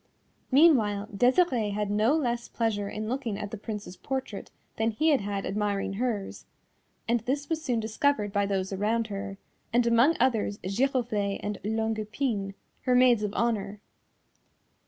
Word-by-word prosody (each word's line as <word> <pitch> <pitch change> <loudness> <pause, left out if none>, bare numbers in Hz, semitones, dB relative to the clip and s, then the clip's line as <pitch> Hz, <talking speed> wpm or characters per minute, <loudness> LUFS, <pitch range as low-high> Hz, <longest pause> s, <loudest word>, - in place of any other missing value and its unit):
Meanwhile 225 -9 +4
Desirée 245 - +3
had 210 -1 -1
no 215 +7 +3
less 240 -6 -1
pleasure 210 -3 -1
in 215 +1 -4
looking 240 -4 -2
at 205 0 -5
the 220 - -5
Prince's 210 -3 -6
portrait 265 -6 -4 0.3
than 220 +1 +2
he 305 +9 +1
had 285 -6 +3
had 200 -1 -3
admiring 200 -1 -1
hers, 215 -2 -3 0.6
and 235 +1 +2
this 270 +6 -3
was 320 -1 -1
soon 245 -6 0
discovered 220 -1 0
by 200 -1 +1
those 195 -1 -1
around 220 +3 0
her, 195 0 -5 0.3
and 240 +1 +3
among 235 +7 +4
others 225 -5 +1
Giroflée 215 -2 0
and 205 -1 -3
Longue 220 +1 -1
Epine, 215 -3 -2 0.3
her 250 -1 +3
maids 250 -3 +5
of 210 -1 -1
honour. 210 -3 -1
220 Hz, 155 wpm, -28 LUFS, 205-250 Hz, 0.6 s, maids